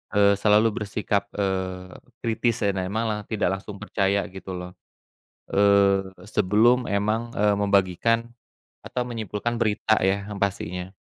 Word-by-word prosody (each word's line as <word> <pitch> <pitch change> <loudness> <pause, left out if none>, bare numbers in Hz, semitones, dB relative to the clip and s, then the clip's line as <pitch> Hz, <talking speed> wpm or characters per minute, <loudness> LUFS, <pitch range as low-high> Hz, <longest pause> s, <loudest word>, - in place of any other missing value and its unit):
eee, 100 0 +6
selalu 105 +1 +4 0.2
bersikap, 100 0 -1
eee, 95 -2 -2 0.3
kritis 115 0 0
dan 100 -1 +1
emang 105 0 -2
tidak 95 -3 0
langsung 105 0 -9
percaya, 100 -1 +1
gitu, 95 -1 -7
loh, 90 0 -7 0.8
eee, 100 -1 +4 0.2
sebelum 110 +5 +3
emang, 110 +4 0
eee, 105 0 +3
membagikan 100 +3 +1 0.5
atau 125 - -4
menyimpulkan 115 -1 -3
berita, 110 -1 +2
ya, 100 +2 -1
yang 100 - -6
pastinya. 95 -1 -3
100 Hz, 125 wpm, -24 LUFS, 95-110 Hz, 0.8 s, eee